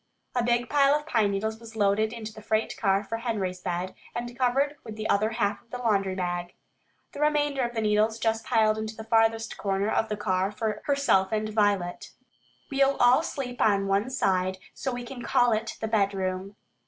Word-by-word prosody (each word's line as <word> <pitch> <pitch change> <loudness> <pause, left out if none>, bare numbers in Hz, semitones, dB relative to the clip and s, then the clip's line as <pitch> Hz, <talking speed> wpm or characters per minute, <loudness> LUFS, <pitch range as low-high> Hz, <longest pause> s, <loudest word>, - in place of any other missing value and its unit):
A 245 - +1
big 240 +1 +1
pile 280 0 +4
of 300 0 -2
pine 225 -9 +2
needles 220 +3 -2
was 230 -1 -12
loaded 210 +1 +2
into 220 -2 -7
the 215 - -11
freight 215 +1 0
car 195 -1 +1
for 220 +3 -4
Henry's 200 -6 -3
bed, 180 0 -3 0.2
and 240 0 -4
covered 270 +4 +1
with 220 -2 -8
the 215 0 -3
other 215 +2 +2
half 205 -2 0
of 230 - -33
the 250 - -5
laundry 200 -6 +1
bag. 175 -1 -3 0.6
The - - -9
remainder 295 -2 +2
of 240 -1 -2
the 225 - 0
needles 215 +1 +2
Jess 225 -1 0
piled 220 -1 +2
into 220 0 -5
the 220 - -7
farthest 225 0 +1
corner 200 +1 0
of 220 - +1
the 210 - -2
car 190 -1 0
for 210 0 -3
herself 275 -10 +2
and 215 0 -1
Violet. 205 -4 0 0.6
"We'll 275 0 +3
all 245 +4 +5
sleep 250 -6 -5
on 200 -2 +3
one 200 +5 +1
side, 190 -7 0 0.2
so 265 - -3
we 245 0 -4
can 245 0 -8
call 245 0 +3
it 220 +1 -3
the 220 - -2
bedroom." 195 -2 -1
220 Hz, 200 wpm, -27 LUFS, 200-240 Hz, 0.6 s, all